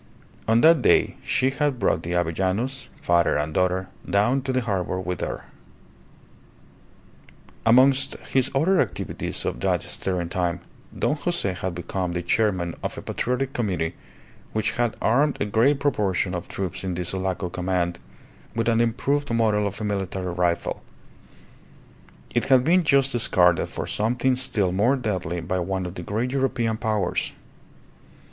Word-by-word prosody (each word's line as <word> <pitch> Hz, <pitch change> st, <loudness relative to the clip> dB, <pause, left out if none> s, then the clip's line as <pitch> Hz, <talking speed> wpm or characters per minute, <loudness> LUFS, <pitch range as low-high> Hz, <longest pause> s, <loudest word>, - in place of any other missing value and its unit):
On 115 Hz, +1 st, +4 dB
that 165 Hz, +1 st, +6 dB
day -, -, +3 dB
she 130 Hz, +1 st, +1 dB
had 145 Hz, -1 st, 0 dB
brought 100 Hz, -6 st, +1 dB
the 85 Hz, +1 st, -4 dB
Avellanos, 95 Hz, +10 st, -1 dB
father 85 Hz, -3 st, +2 dB
and 75 Hz, +1 st, -2 dB
daughter, 90 Hz, +1 st, +1 dB, 0.2 s
down 120 Hz, +7 st, +2 dB
to 130 Hz, 0 st, -2 dB
the 130 Hz, 0 st, +1 dB
harbour 95 Hz, -5 st, -2 dB
with 90 Hz, -2 st, -4 dB
her. -, -, -4 dB, 2.2 s
Amongst 130 Hz, +3 st, +5 dB
his 130 Hz, -1 st, 0 dB
other 175 Hz, +7 st, +3 dB
activities -, -, -3 dB
of -, -, -2 dB
that -, -, +1 dB
stirring 90 Hz, -3 st, -2 dB
time, 90 Hz, -1 st, -1 dB, 0.4 s
Don -, -, +1 dB
Jose 145 Hz, -, -1 dB
had 95 Hz, -1 st, -4 dB
become 90 Hz, +1 st, -3 dB
the 85 Hz, 0 st, -2 dB
chairman 90 Hz, -3 st, +1 dB
of -, -, -4 dB
a -, -, -6 dB
Patriotic 130 Hz, +2 st, -2 dB
Committee 90 Hz, -8 st, -1 dB, 0.6 s
which 110 Hz, 0 st, 0 dB
had 120 Hz, -2 st, -1 dB
armed 140 Hz, +6 st, +3 dB
a -, -, 0 dB
great 120 Hz, +7 st, +3 dB
proportion 100 Hz, -9 st, 0 dB
of 90 Hz, -1 st, -4 dB
troops 95 Hz, -1 st, -4 dB
in 95 Hz, -2 st, -2 dB
the 90 Hz, 0 st, -3 dB
Sulaco 95 Hz, 0 st, -2 dB
command 90 Hz, -1 st, -1 dB, 0.6 s
with 115 Hz, 0 st, 0 dB
an 115 Hz, 0 st, +3 dB
improved 140 Hz, +4 st, 0 dB
model 110 Hz, -3 st, +2 dB
of 100 Hz, -, -4 dB
a -, -, -4 dB
military 95 Hz, -3 st, -2 dB
rifle. 85 Hz, -1 st, -1 dB, 1.5 s
It -, -, +1 dB
had 130 Hz, -2 st, +5 dB
been 175 Hz, +6 st, +4 dB
just 140 Hz, -3 st, +3 dB
discarded 90 Hz, -8 st, +3 dB
for -, -, -4 dB
something 125 Hz, +4 st, +1 dB
still 110 Hz, -8 st, +1 dB
more 105 Hz, +9 st, +3 dB
deadly 95 Hz, -, -2 dB
by 90 Hz, +3 st, -2 dB
one 95 Hz, +1 st, -2 dB
of 90 Hz, -, -5 dB
the 90 Hz, -, -7 dB
great 110 Hz, +8 st, -2 dB
European 125 Hz, -4 st, 0 dB
powers. 110 Hz, -5 st, -1 dB
105 Hz, 155 wpm, -24 LUFS, 90-125 Hz, 2.2 s, that